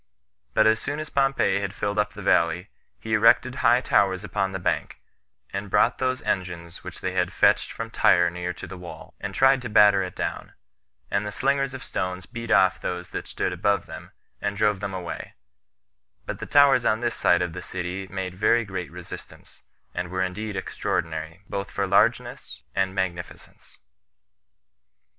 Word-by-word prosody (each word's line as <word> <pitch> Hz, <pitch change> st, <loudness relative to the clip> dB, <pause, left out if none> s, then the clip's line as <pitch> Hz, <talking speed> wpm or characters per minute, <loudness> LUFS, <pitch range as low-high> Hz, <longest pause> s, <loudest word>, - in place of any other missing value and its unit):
But 110 Hz, -, +5 dB
as 110 Hz, 0 st, +4 dB
soon 145 Hz, +5 st, -3 dB
as 155 Hz, -, -6 dB
Pompey 135 Hz, -7 st, +2 dB
had 100 Hz, 0 st, -4 dB
filled 105 Hz, 0 st, -1 dB
up 105 Hz, 0 st, 0 dB
the 105 Hz, -, -9 dB
valley, 85 Hz, +1 st, +2 dB, 0.3 s
he 110 Hz, -, -4 dB
erected 115 Hz, +3 st, +5 dB
high 120 Hz, 0 st, +5 dB
towers 95 Hz, -5 st, +2 dB
upon 100 Hz, -1 st, -1 dB
the 95 Hz, -, -3 dB
bank, 90 Hz, -, -2 dB, 0.5 s
and 100 Hz, +1 st, -4 dB
brought 120 Hz, -, +3 dB
those 130 Hz, 0 st, -1 dB
engines 90 Hz, -3 st, -3 dB
which -, -, -8 dB
they -, -, -1 dB
had -, -, 0 dB
fetched -, -, +3 dB
from -, -, -6 dB
Tyre 85 Hz, -1 st, +4 dB
near 90 Hz, +1 st, -3 dB
to -, -, -8 dB
the 95 Hz, -, -9 dB
wall, 90 Hz, -1 st, -10 dB
and 100 Hz, -1 st, -5 dB
tried 135 Hz, 0 st, +5 dB
to 120 Hz, -, -5 dB
batter 105 Hz, -2 st, +6 dB
it 90 Hz, -1 st, -5 dB
down; -, -, -4 dB, 0.6 s
and 100 Hz, -, +1 dB
the 105 Hz, -, -4 dB
slingers 135 Hz, +3 st, 0 dB
of 130 Hz, -, -8 dB
stones 90 Hz, 0 st, -3 dB
beat 115 Hz, -1 st, -7 dB
off 95 Hz, -4 st, +4 dB
those 90 Hz, -1 st, -4 dB
that -, -, -5 dB
stood 90 Hz, -, -2 dB
above 100 Hz, +3 st, +1 dB
them, -, -, -9 dB, 0.3 s
and 100 Hz, 0 st, -2 dB
drove 105 Hz, -2 st, +2 dB
them 100 Hz, -1 st, -4 dB
away; 85 Hz, -3 st, -6 dB, 0.9 s
but -, -, -5 dB
the -, -, -6 dB
towers 140 Hz, -3 st, +5 dB
on 110 Hz, 0 st, +2 dB
this 120 Hz, -1 st, 0 dB
side 90 Hz, 0 st, +3 dB
of 85 Hz, -2 st, -4 dB
the -, -, -6 dB
city 95 Hz, +1 st, -5 dB
made 95 Hz, -1 st, -4 dB
very 110 Hz, +4 st, +2 dB
great 95 Hz, -3 st, -5 dB
resistance, 90 Hz, 0 st, -11 dB, 0.3 s
and 90 Hz, -1 st, -3 dB
were 95 Hz, +1 st, -1 dB
indeed 100 Hz, +3 st, -4 dB
extraordinary 80 Hz, -2 st, -3 dB
both 100 Hz, 0 st, -4 dB
for -, -, -1 dB
largeness 65 Hz, -, +1 dB
and 95 Hz, -1 st, 0 dB
magnificence. 90 Hz, -3 st, -5 dB
100 Hz, 180 wpm, -25 LUFS, 90-110 Hz, 0.9 s, batter